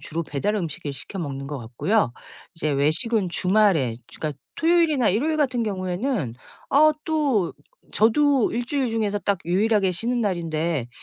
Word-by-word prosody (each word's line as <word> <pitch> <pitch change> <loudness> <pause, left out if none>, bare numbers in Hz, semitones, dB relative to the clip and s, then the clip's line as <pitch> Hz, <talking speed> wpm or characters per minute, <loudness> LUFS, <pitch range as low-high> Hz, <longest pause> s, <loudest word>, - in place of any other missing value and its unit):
주로 165 +2 -4
배달 155 +7 -2
음식을 155 -6 -4
시켜 140 +8 -8
먹는 140 -5 -4
것 145 -1 -4
같고요. 120 - 0 0.4
이제 155 -2 -1
외식은 170 +9 +1
주말에 180 - +2 0.2
그러니까 150 -3 -4 0.2
토요일이나 325 -7 +3
일요일 290 +12 +1
같은 255 -5 +1
경우에는 185 - -2 0.4
어 305 +2 +6
또 285 - +1 0.4
저도 270 +3 +3
1 240 +1 -1
주일 270 -1 0
중에서 215 -2 -1
딱 200 -1 0
유일하게 195 +2 +2
쉬는 240 +7 -1
날인데 165 - -1
200 Hz, 325 characters per minute, -24 LUFS, 160-240 Hz, 0.4 s, 어